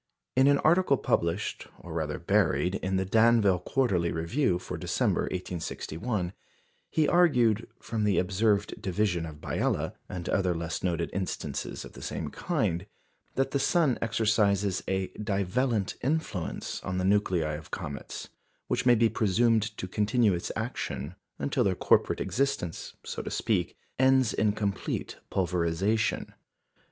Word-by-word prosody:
In 130 +1 +5
an 140 0 +5
article 160 -2 +4
published, 85 -1 -1
or 85 - -9
rather 80 -2 -2
buried, 90 - +2
in 95 +1 -1
the 95 0 +1
Danville 110 -2 +4
Quarterly 90 -5 +1
Review 85 - +1
for 90 - -6
December, - - 0
1861, 90 +2 -3 0.6
he 155 -2 +2
argued, 125 - +4
from 110 -2 -3
the 105 -2 +2
observed 100 +3 +1
division 90 -3 0
of 75 - -8
Biela, - - -1 0.2
and 90 -2 -5
other 95 -2 +1
less 80 -1 -3
noted 85 -2 -1
instances 90 -7 -3
of - - -12
the - - -11
same - - -4
kind, 85 +4 -1 0.5
that 135 0 +1
the 140 - +1
sun 150 -2 +2
exercises 105 -4 +2
a 95 0 -1
"divellent 105 +2 -1
influence" 135 - -2
on 90 -1 -3
the 90 - 0
nuclei 95 -6 +2
of 75 +1 -7
comets, 70 -1 -6 0.4
which - - -1
may 120 - +7
be 115 0 +4
presumed 110 0 +2
to 95 - -4
continue 105 +2 +2
its 85 - -3
action 110 - -3 0.2
until 135 -3 0
their 95 -4 +1
corporate - - +3
existence 135 -11 -2
(so - - -4
to - - -5
speak) - - -1 0.2
ends 130 -2 +4
in 105 -1 +2
complete 100 -2 -3
pulverisation. 90 +4 0
100 Hz, 140 wpm, -28 LUFS, 90-115 Hz, 0.6 s, may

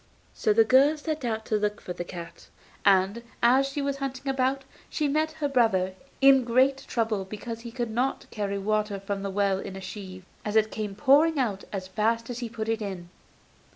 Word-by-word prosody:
So 215 - +1
the 225 +2 +6
girl 270 +7 +5
set 310 -1 -4
out 220 -2 -2
to 215 - +1
look 210 0 -1
for 180 - -6
the 175 - -5
cat, 170 -1 -9 0.4
and, 195 +3 +3 0.2
as 260 +3 +5
she 280 +1 -3
was 280 0 -1
hunting 275 0 -5
about, 270 0 0 0.3
she 300 - 0
met 310 +2 0
her 310 -2 -2
brother, 220 -9 +2 0.3
in 270 -1 +7
great 260 +3 +3
trouble 220 -4 0
because 215 +4 -7
he 235 0 -8
could 240 -2 -3
not 250 +4 -1
carry 200 -2 -2
water 210 0 -1
from 195 0 -4
the 200 - -3
well 195 -1 +1
in 195 - -7
a 195 - -7
sieve, 190 -1 -8 0.2
as 210 0 -3
it 220 0 +3
came 210 -2 -4
pouring 290 +6 +4
out 215 -7 -1
as 190 -2 -4
fast 230 +5 0
as 240 - -5
he 240 -2 -4
put 220 -1 -5
it 225 0 -1
in. 185 -4 -5
225 Hz, 205 wpm, -27 LUFS, 200-265 Hz, 0.4 s, in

